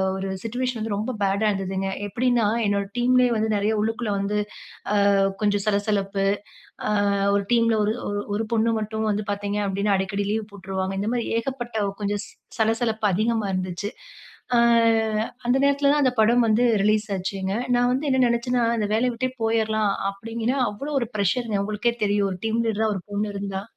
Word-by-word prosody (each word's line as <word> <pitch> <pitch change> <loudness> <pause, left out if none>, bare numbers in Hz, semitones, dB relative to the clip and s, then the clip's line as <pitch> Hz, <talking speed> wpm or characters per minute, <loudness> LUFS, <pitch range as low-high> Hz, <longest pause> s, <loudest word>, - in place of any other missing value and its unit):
ஒரு 195 0 -3
சிட்யூயேஷன் 245 +1 -2
வந்து 220 -1 -2
ரொம்ப 220 +5 -2
பேடா 200 +2 +2
இருந்ததுங்க. 195 0 -2 0.2
எப்டின்னா, 240 +2 +1 0.2
என்னோட 200 -1 +1
டீம்லயே 250 +1 +4
வந்து 220 +1 0
நெறைய 205 +2 +1
உள்ளுக்குள்ள 225 0 -1
வந்து 200 +1 -1 0.8
அ - - +3 0.3
கொஞ்சம் 205 -1 +1
சலசலப்பு. 200 -1 0 0.6
அ - - +1 0.5
ஒரு 200 - 0
டீம்ல 230 -1 +3
ஒரு 210 - +1 0.4
ஒரு 220 +2 -1
பொண்ணு 230 +1 +2
மட்டும் 220 +1 -3
வந்து 210 0 -1
பார்த்தீங்க 205 0 -2
அப்டின்னா, 200 +1 +1
அடிக்கடி 200 +1 -2
லீவ் 215 -1 -3
போட்டுருவாங்க. 190 -1 -4
இந்த 210 +2 -1
மாரி 240 -2 -1
ஏகப்பட்ட 240 -1 -4 0.3
கொஞ்சம் 205 0 -1
ச - - -14 0.3
சலசலப்பு 220 0 +1
அதிகமா 220 +2 0
இருந்துச்சு. 185 +2 -3 0.7
ஆ - - +5 0.9
அந்த 245 +2 +3
நேரத்தில 280 0 +3
தான் 295 0 +2
அந்த 255 - +3
படம் 235 +2 +4
வந்து 220 +3 +3 0.2
ரிலீஸ் 215 +1 +2
ஆச்சுங்க. 190 0 -3 0.2
நான் 245 0 +3
வந்து 270 +4 -1
என்ன 260 - +2
நெனைச்சேன்னா, 240 +1 +1
இந்த 210 -2 0
வேலைய 245 +3 +2
விட்டே 255 +2 -1
போயரலாம் 220 -2 +1 0.2
அப்படின்னு, 225 +5 -3
அவ்வளோ 275 +9 -6
ஒரு 235 - -2
பிரஷர் 210 +5 0
உங்களுக்கே 215 +3 -1
தெரியும். 205 -1 +1
ஒரு 180 - -6
டீம் 225 +1 0
லீடரா 220 0 +1
ஒரு 190 - -4
பொண்ணு 205 +1 -1
இருந்தா. 195 -1 -4
215 Hz, 165 wpm, -24 LUFS, 200-235 Hz, 0.9 s, ஆ